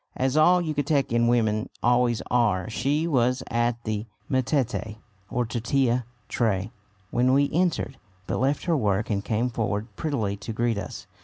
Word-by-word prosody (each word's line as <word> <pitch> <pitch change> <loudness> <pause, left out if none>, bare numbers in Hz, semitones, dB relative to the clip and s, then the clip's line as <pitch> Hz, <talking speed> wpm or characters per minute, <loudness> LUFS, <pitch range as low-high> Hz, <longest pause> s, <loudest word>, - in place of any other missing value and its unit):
As 130 +1 0
all 175 +3 +5
Yucatecan 140 -6 +1
women 110 -3 +1
always 120 -1 +3
are, 110 -6 +2
she 145 +7 0
was 125 -5 +1
at 120 0 0
the 110 0 -3 0.2
metate 130 -4 0 0.3
or 125 0 0
tortilla 120 +2 0 0.2
tray 105 -3 0 0.4
when 125 +2 +3
we 140 +1 +3
entered, 170 -5 0 0.3
but - - -2
left 135 +3 +1
her 170 -2 +2
work 105 -3 0
and 100 -1 0
came 120 +3 0
forward 105 -1 -2
prettily 115 -10 -1
to 105 +3 -6
greet 115 -1 0
us. 95 - -7
120 Hz, 150 wpm, -25 LUFS, 110-135 Hz, 0.4 s, all